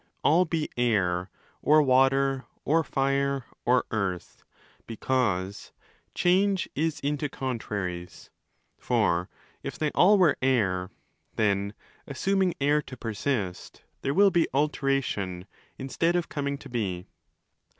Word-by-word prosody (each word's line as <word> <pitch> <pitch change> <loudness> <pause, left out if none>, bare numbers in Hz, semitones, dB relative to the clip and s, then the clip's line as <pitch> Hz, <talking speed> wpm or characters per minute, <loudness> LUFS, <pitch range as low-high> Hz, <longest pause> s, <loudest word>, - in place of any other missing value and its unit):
all 170 +4 +4
be 160 -2 -1
Air 95 -6 +1 0.3
or 155 +1 +5
Water 135 0 +3 0.2
or 160 +3 +3
Fire 140 -1 0 0.2
or 125 0 +3
Earth—because 100 +1 -3 0.2
' - - -39
Change 190 +2 +2
is 160 +1 -1
into 145 +1 -1
contraries'.' 100 -10 -5 0.5
For 85 +1 +1 0.3
if - - -6
they 155 -1 0
all 205 +4 +5
were 175 -6 +4
Air, 100 -9 +1 0.5
then 100 -1 0 0.3
(assuming 190 +6 0
Air 145 +2 +3
to 130 -3 -11
persist) 110 -4 -3 0.2
there 140 - -1
will 200 +1 +6
be 170 -3 +2
'alteration' 135 -11 -1 0.3
instead 165 +6 0
of 175 -1 -1
coming 140 -1 -2
to 140 - -12
be. 95 -7 -3
135 Hz, 115 wpm, -27 LUFS, 100-150 Hz, 0.5 s, will